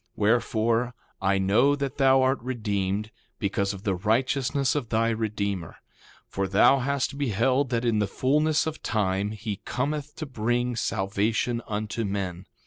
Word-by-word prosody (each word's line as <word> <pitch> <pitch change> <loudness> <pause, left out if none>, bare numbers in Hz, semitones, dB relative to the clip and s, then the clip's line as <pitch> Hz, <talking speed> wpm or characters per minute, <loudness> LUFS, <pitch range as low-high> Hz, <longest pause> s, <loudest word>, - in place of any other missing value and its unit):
Wherefore, 115 +2 +1 0.3
I 95 0 +2
know 110 +9 +3
that 140 0 -4
thou 135 -1 +5
art 130 -1 +1
redeemed, 105 -4 -2 0.3
because 100 -2 0
of 100 -1 -8
the 100 -3 +1
righteousness 130 - +1
of 140 -7 -2
thy 115 0 +2
Redeemer; 100 -5 -2 0.5
for 95 0 -2
thou 105 +8 +5
hast 140 +1 -1
beheld 130 +2 +1
that 120 -1 -1
in 115 -3 +2
the 105 - +1
fulness 150 +9 +1
of 160 -1 -4
time 100 -2 0
he 105 -1 -5
cometh 140 +7 -3
to 155 - -5
bring 120 -1 -1
salvation 110 +3 0
unto 110 +2 -3
men. 95 -3 -3
115 Hz, 145 wpm, -26 LUFS, 100-130 Hz, 0.5 s, thou